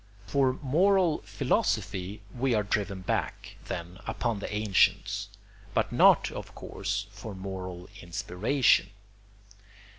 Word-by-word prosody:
] 100 -1 -25
For 135 +4 +2
moral 175 +3 +3
philosophy 95 +2 -1
we 125 -1 +1
are 105 - +2
driven 100 -1 -1
back, 90 - -3
then, 90 0 -6
upon 115 -4 -1
the - - -5
ancients; 100 -1 +2 0.5
but - - +1
not, - - +5
of - - -8
course, 100 +1 -3
for 105 0 -8
moral 95 -2 -6
inspiration. 95 +7 +2
100 Hz, 115 wpm, -29 LUFS, 95-120 Hz, 0.5 s, not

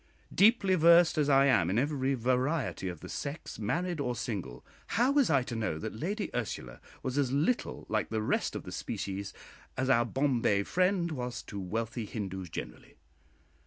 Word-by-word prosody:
Deeply 205 -2 +5
versed 170 0 +6
as 150 -2 +1
I 135 0 +6
am 90 -11 +3
in 100 - 0
every 135 0 +1
variety 130 -1 0
of 85 -3 -8
the - - -8
sex, 145 -2 -6
married 175 - -1
or 125 -3 -1
single, 95 - -5 0.3
how 245 +4 +4
was 280 -2 +3
I 135 -4 +3
to 120 - -5
know 110 -8 -1
that 80 - -5
Lady 195 - -3
Ursula 65 - -4 0.2
was 130 +2 -1
as 135 -3 +1
little 155 - 0
like 110 0 -1
the 110 -1 -1
rest - - 0
of - - -4
the - - -8
species 100 0 -4 0.5
as 130 0 +1
our 120 -2 +5
Bombay 120 -6 +1
friend 180 - +1
was 125 -4 -4
to 100 - -7
wealthy 110 +4 -3
Hindoos 95 -4 -5
generally? - - -8
130 Hz, 175 wpm, -30 LUFS, 110-160 Hz, 0.5 s, versed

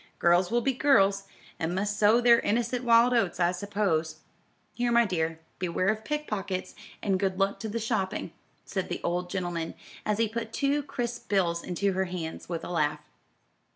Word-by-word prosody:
Girls 175 +1 +3
will 240 +2 +2
be 270 +3 +1
girls, 200 -8 +3 0.3
and 165 +2 -1
must 205 +2 -1
sow 215 +3 +5
their 235 -1 +6
innocent 235 +3 0
wild 235 +1 +5
oats 195 -8 +1
I 175 0 +3
suppose. 180 -5 -1 0.6
Here, 240 0 0
my 235 0 +5
dear, 165 -4 -1 0.2
beware 185 +1 0
of 215 0 -1
pick 300 +5 -2
pockets, 190 -3 -3 0.3
and 195 -2 +1
good 190 -1 0
luck 195 +1 +1
to 220 - -4
the 220 - -3
shopping," 210 -6 -2 0.3
said 190 -2 -3
the - - -3
old 180 +1 -1
gentleman, 175 -3 -3 0.3
as 210 -1 0
he 225 0 +2
put 225 +1 -5
two 285 +1 +1
crisp 245 -4 -5
bills 175 -4 +1
into 195 +2 -1
her 190 +1 0
hands, 175 -3 -6
with 170 -2 -3
a - - -6
laugh. 150 -3 0
195 Hz, 185 wpm, -28 LUFS, 180-230 Hz, 0.6 s, their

